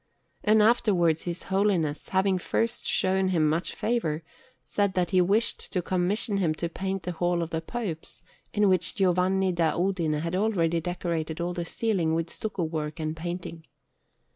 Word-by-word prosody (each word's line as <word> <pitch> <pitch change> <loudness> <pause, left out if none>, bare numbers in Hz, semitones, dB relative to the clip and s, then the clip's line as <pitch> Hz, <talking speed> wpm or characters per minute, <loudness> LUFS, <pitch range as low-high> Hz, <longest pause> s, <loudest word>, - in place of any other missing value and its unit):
And 215 0 +5
afterwards 190 -8 +3
his 175 0 -3
Holiness, 190 -6 0
having 190 0 +2
first 230 +5 -1
shown 190 0 +2
him 165 -4 +2
much 160 +4 -1
favour, 170 -10 -1 0.4
said 200 -2 0
that 180 0 +1
he 185 -1 +5
wished 205 +6 +1
to 180 -3 0
commission 190 +4 0
him 165 -5 +1
to 170 +2 -3
paint 190 +2 -3
the 180 - -3
Hall 175 0 0
of 165 - -6
the 160 - -1
Popes, 175 -4 -5 0.3
in 210 -1 +3
which 185 +1 +3
Giovanni 190 -1 +2
da 170 -3 +1
Udine 170 -4 0
had 165 +2 -2
already 175 -5 +1
decorated 165 -2 -3
all 175 +1 -1
the 175 -1 -3
ceiling 175 -5 0
with 165 0 -2
stucco 205 -4 -3
work 155 0 -3
and 155 0 -2
painting. 170 0 -6
180 Hz, 165 wpm, -27 LUFS, 165-195 Hz, 0.4 s, And